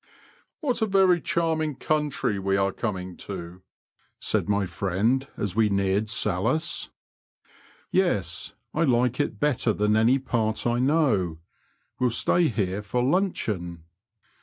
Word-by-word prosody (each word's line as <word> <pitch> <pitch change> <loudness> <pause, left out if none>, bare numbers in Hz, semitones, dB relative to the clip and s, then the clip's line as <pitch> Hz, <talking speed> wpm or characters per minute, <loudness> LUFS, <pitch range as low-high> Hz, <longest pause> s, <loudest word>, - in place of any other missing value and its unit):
*' - - -36
What 255 -6 -1
a 220 - +2
very 190 -3 +4
charming 160 -3 0
country 150 -9 -1
we 95 0 +1
are 95 0 +1
coming 95 -5 -4
to 90 -2 -8
I 95 - -53 0.2
" - - -40
said - - 0
my 100 -1 +2
friend, 100 +9 0
as 100 -2 -3
we 110 -1 +3
neared 100 +1 +1
Salhouse. 135 - 0 0.5
" - - -30
Tes, 100 - 0 0.2
I - - -1
like 125 -2 +2
it 145 - -1
better 135 -6 +1
than 105 +1 +1
any 115 +4 +4
part 115 -5 -1
I 120 0 +1
know; 125 - +2 0.6
we'll 125 - +3
stay 165 +8 +3
here 100 -5 -1
for 115 +5 -1
luncheon." 110 - -1
110 Hz, 145 wpm, -26 LUFS, 95-150 Hz, 0.6 s, very